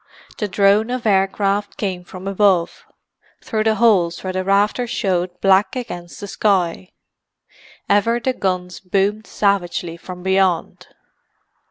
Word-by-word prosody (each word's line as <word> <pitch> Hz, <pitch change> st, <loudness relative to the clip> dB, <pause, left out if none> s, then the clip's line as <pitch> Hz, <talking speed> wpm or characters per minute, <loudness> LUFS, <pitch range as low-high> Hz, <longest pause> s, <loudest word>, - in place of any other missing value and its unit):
The 210 Hz, -, -1 dB
drone 205 Hz, +3 st, +3 dB
of 250 Hz, -1 st, -3 dB
aircraft 200 Hz, 0 st, +1 dB
came 185 Hz, -4 st, -3 dB
from 185 Hz, +2 st, -9 dB
above, 195 Hz, -3 st, +1 dB, 0.6 s
through 215 Hz, -1 st, -2 dB
the 220 Hz, 0 st, +3 dB
holes 190 Hz, -8 st, +2 dB
where 185 Hz, -1 st, -3 dB
the 185 Hz, 0 st, -1 dB
rafters 205 Hz, +5 st, +1 dB
showed 180 Hz, -5 st, -1 dB
black 195 Hz, +5 st, +3 dB
against 175 Hz, -9 st, -7 dB
the 205 Hz, -, -7 dB
sky. 190 Hz, -4 st, 0 dB, 1.0 s
Ever 215 Hz, +4 st, +2 dB
the 260 Hz, +2 st, -1 dB
guns 180 Hz, -4 st, -3 dB
boomed 200 Hz, +3 st, -1 dB
savagely 175 Hz, -4 st, -1 dB
from 180 Hz, +1 st, -10 dB
beyond. 190 Hz, -2 st, 0 dB
195 Hz, 130 wpm, -20 LUFS, 180-210 Hz, 1.0 s, drone